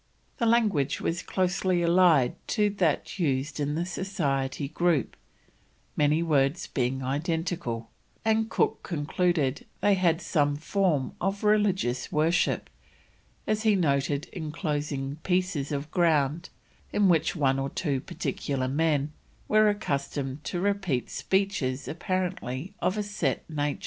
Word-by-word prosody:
The 235 - +2
language 205 - +2
was 170 +1 -1
closely 185 -1 0
allied 170 -6 +5
to 210 -2 +2
that 185 -2 0
used 140 -2 0
in 145 0 -1
the 170 +2 -1
Society 150 -8 -2
Group, 160 -2 +1 0.8
many 150 +2 +3
words 145 0 +2
being 130 0 -1
identical; 150 -4 -2 0.3
and 220 0 +2
Cook 225 - +1
concluded 155 -3 0
they 205 - +4
had 175 -4 +2
some 145 -6 +1
form 155 -2 0
of 195 +1 -1
religious 195 -12 +1
worship, 160 +4 +1 0.8
as 215 0 0
he 215 -2 +4
noted 145 -4 +1
enclosed 150 -3 -3
pieces 180 -6 0
of 145 +1 -3
ground 160 -1 +2 0.4
in 205 -1 +3
which 165 0 +2
one 135 -4 +2
or 135 0 -1
two 140 -5 -1
particular 130 -1 -3
men 150 +1 +1 0.4
were 215 0 +5
accustomed 140 -7 -2
to 175 - -2
repeat 190 -9 0
speeches 170 -9 -1
apparently 175 -2 -3
of 190 - 0
a 210 - 0
set 185 -10 -2
nature. 145 -2 -2
160 Hz, 125 wpm, -27 LUFS, 140-185 Hz, 0.8 s, allied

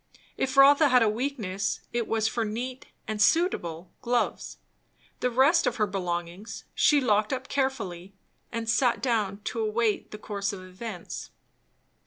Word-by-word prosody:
If 265 +1 -2
Rotha 285 +2 +7
had 250 -2 +5
a - - +3
weakness, 215 -5 -2
it 235 -2 -1
was 220 -1 +1
for 230 0 -1
neat 245 +4 -5 0.2
and 215 -1 -2
suitable 185 - +1
gloves. 245 0 -1 0.6
The 250 - +1
rest 275 +8 +4
of - - 0
her 215 - +2
belongings 180 0 -4
she 295 - +4
locked 215 -5 +2
up 260 -1 -3
carefully, 200 -10 -2 0.4
and 230 -1 -4
sat 235 +2 +2
down 210 -5 -1
to 230 - -3
await 220 0 0
the 210 - -8
course 200 -1 -3
of 185 -2 -8
events. 185 0 -7
225 Hz, 150 wpm, -27 LUFS, 200-255 Hz, 0.6 s, Rotha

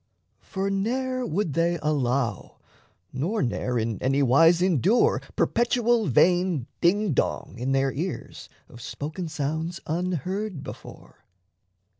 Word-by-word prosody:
For 195 -1 -3
ne'er 255 +5 -1
would 165 -2 -1
they 170 +2 +1
Allow, 130 - -1 0.6
nor 170 - -1
ne'er 125 +1 -1
in 110 -2 -2
anywise 140 +6 +4
endure 185 - +3
Perpetual 235 -2 +2
vain 175 0 +3 0.2
dingdong 175 - 0
in 130 +2 -1
their 135 0 +2
ears 155 -1 -5 0.2
Of 120 - -13
spoken 155 +9 -5
sounds 160 +3 -3
unheard 180 - -3
before. 145 - -11
165 Hz, 105 wpm, -25 LUFS, 135-195 Hz, 0.6 s, anywise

